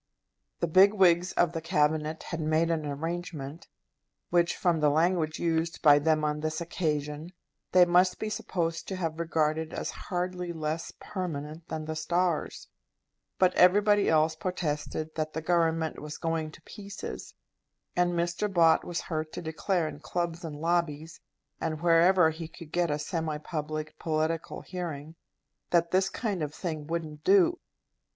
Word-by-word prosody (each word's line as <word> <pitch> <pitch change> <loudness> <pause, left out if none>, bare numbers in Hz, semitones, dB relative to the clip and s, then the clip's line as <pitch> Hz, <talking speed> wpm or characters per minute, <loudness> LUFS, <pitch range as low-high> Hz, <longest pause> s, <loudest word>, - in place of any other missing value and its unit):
The - - +3
big 190 +5 +6
wigs 180 -2 +4
of 175 -2 +2
the 165 -1 -4
Cabinet 155 -1 0
had 165 - -5
made 155 +2 +2
an 155 -2 -1
arrangement 160 0 -5 0.6
which, 175 0 +2
from 175 -3 +2
the 150 -1 +4
language 160 +1 +1
used 165 0 -1
by 145 -2 +7
them 155 +1 +2
on 150 0 -1
this 155 0 -2
occasion, 155 -2 -2 0.4
they 180 -1 +7
must 180 +1 +3
be 215 - -3
supposed 170 -5 -2
to 190 - -3
have 165 -3 -3
regarded 160 -1 0
as - - -3
hardly 180 -1 -3
less 160 0 -3
permanent 165 -4 -5
than 155 -1 -4
the 160 0 -4
stars; 170 +1 -1 0.7
but 185 -1 +4
everybody 205 +3 +5
else 160 0 +3
protested 155 -2 -3
that 155 -1 -3
the 160 - -3
Government 165 -2 +1
was 150 0 -7
going 165 -2 -2
to 155 - -15
pieces; 200 -2 -8 0.6
and 175 0 +2
Mr. 175 +4 -1
Bott 165 -3 +5
was 175 -1 -3
heard 155 -2 -4
to - - -5
declare 160 +2 -1
in 150 - -7
clubs 170 +2 -3
and 160 -3 -5
lobbies, 160 -1 -1 0.4
and 155 -1 -2
wherever 170 0 +5
he 160 +1 -7
could 160 -1 -12
get 175 -1 +1
a 145 - 0
semi 160 0 -2
public, 155 0 -5
political 160 +1 -1
hearing, 160 -4 -6 0.6
that 170 -1 +2
this 190 +1 +3
kind 205 -6 -3
of 150 0 -3
thing 155 -5 -4
wouldn't 160 -2 -4
do. 355 -3 +4
165 Hz, 155 wpm, -29 LUFS, 155-175 Hz, 0.7 s, by